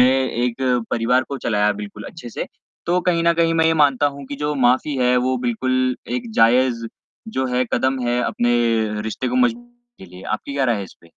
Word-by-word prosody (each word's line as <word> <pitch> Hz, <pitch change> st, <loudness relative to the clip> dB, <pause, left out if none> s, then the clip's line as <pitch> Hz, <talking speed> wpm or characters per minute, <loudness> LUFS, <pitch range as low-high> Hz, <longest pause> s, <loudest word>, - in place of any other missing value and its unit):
एक 125 Hz, -2 st, +2 dB, 0.4 s
परिवार 120 Hz, +2 st, +2 dB
को 140 Hz, -, -4 dB
चलाया 105 Hz, -3 st, +1 dB
बिल्कुल 105 Hz, 0 st, -8 dB
अच्छे 125 Hz, -8 st, -9 dB
से। -, -, -4 dB, 0.4 s
तो 180 Hz, +1 st, +2 dB
कहीं 170 Hz, -2 st, +2 dB
न 170 Hz, -, +5 dB
कहीं 165 Hz, 0 st, +2 dB
मैं 165 Hz, 0 st, +3 dB
ये 165 Hz, -, +3 dB
मानता 145 Hz, -2 st, +3 dB
हूँ 140 Hz, 0 st, -9 dB
कि 140 Hz, -, -6 dB
जो 150 Hz, +1 st, -2 dB
माफी 130 Hz, +2 st, +2 dB
है 125 Hz, 0 st, +3 dB
वो 130 Hz, 0 st, +1 dB
बिल्कुल 130 Hz, +1 st, 0 dB, 0.2 s
एक 240 Hz, -2 st, -6 dB
जायज़ 120 Hz, 0 st, +3 dB, 0.5 s
जो 130 Hz, -, +1 dB
है 125 Hz, +1 st, +2 dB
कदम 130 Hz, +2 st, +1 dB
है 120 Hz, +1 st, +1 dB
अपने 120 Hz, 0 st, +1 dB, 0.5 s
रिश्ते 110 Hz, 0 st, -3 dB
को 250 Hz, -, -1 dB
मजबूत 240 Hz, -1 st, +1 dB, 0.4 s
करने -, -, -9 dB
के -, -, -19 dB
लिए, 90 Hz, -, -11 dB
आपकी 140 Hz, -, -4 dB
क्या 140 Hz, -1 st, +1 dB
राय 120 Hz, -3 st, +2 dB
है 100 Hz, -, -4 dB
इस -, -, -14 dB
पे? 85 Hz, -, -18 dB
130 Hz, 215 wpm, -21 LUFS, 120-145 Hz, 0.5 s, न